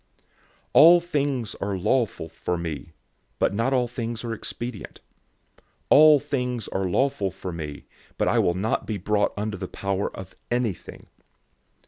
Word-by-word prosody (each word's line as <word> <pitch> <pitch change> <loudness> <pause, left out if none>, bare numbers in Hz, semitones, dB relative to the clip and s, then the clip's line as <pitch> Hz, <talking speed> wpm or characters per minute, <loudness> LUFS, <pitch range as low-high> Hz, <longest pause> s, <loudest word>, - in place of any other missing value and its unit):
006:012 - - -39 0.5
"All 170 +3 +9
things 145 - -2
are 100 -1 -1
lawful 110 -3 0
for 85 +2 -3
me," 80 -1 -6 0.4
but - - +1
not 115 +6 0
all 125 -2 +2
things 120 -1 -5
are 115 -1 -3
expedient. 115 0 -7 0.9
"All 155 0 +8
things 125 -5 -3
are 95 -1 -1
lawful 130 -1 +1
for 95 0 -7
me," 75 -4 -7 0.3
but - - +1
I - - +3
will 85 - +2
not 105 +5 -1
be 110 - -2
brought 105 +2 +1
under 105 -1 -3
the - - -5
power 100 0 -2
of 95 -1 -9
anything. 120 -6 -3
110 Hz, 150 wpm, -25 LUFS, 95-125 Hz, 0.9 s, All